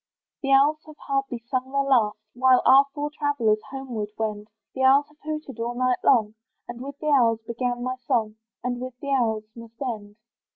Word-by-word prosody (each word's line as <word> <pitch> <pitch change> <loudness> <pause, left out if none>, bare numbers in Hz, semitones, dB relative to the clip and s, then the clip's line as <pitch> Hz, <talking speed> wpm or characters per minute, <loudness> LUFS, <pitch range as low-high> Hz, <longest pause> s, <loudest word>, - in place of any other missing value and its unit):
The 275 - -1
owls 285 +3 +5
have 310 - -12
hardly 275 -3 -1
sung 255 +3 -4
their 275 0 +1
last, 230 -6 +2 0.2
While 255 0 +4
our 275 +1 +7
four 295 0 -4
travellers 235 -8 +1
homeward 250 -6 -5
wend; 210 -1 -3 0.3
The 265 - -4
owls 270 +2 +5
have 300 0 -25
hooted 305 -4 -6
all 235 +1 -2
night 255 0 +1
long, 220 -5 +4 0.3
And 240 0 -8
with 280 +1 -7
the 305 0 -1
owls 230 -5 +3
began 245 +1 -2
my 255 +1 -2
song, 235 -4 -1 0.3
And 245 0 -2
with 255 -1 -7
the 280 0 -4
owls 225 -5 +1
must 230 0 -13
end. 215 -6 -5
255 Hz, 190 wpm, -25 LUFS, 230-275 Hz, 0.3 s, our